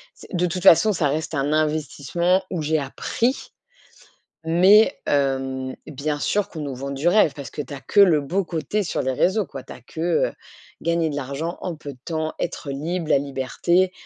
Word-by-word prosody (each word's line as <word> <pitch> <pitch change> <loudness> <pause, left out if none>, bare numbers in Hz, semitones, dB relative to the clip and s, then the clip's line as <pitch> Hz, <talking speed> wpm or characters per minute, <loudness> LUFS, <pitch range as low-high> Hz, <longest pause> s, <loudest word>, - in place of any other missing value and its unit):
c'est - - -15
de 180 -1 +1
toute 180 0 -3
façon, 210 +5 +7
ça 155 -4 +1
reste 155 +3 -2
un 140 +1 0
investissement 155 +4 0
où 175 -4 -2
j'ai 155 +1 +1
appris. 230 - -2 1.0
Mais, 185 +7 +5
hem, 135 -2 0
bien 150 +1 -3
sûr 205 +6 0
qu'on 160 - -7
nous 140 -2 -4
vend 135 +2 -5
du 140 +4 -2
rêve, 180 -5 +4
parce 140 -5 -7
que 150 - -4
tu 140 - -8
as 135 - -7
que 205 - +1
le 170 -7 +6
beau 180 +7 -1
côté 175 +5 -2
sur 175 - -2
les 130 - -1
réseaux 195 +9 +2
quoi. 135 -5 -9
Tu - - -10
as - - -13
que, 160 - -12 0.3
heu, - - -14 0.5
gagner 170 -1 +1
de 145 - -4
l'argent, 145 +5 -4
en 180 -3 -4
peu 150 -2 -8
de - - -20
temps, 160 -2 -2
être 140 - -4
libre, 160 +5 -3
la - - +5
liberté. 145 +7 0
155 Hz, 200 wpm, -23 LUFS, 140-175 Hz, 1.0 s, façon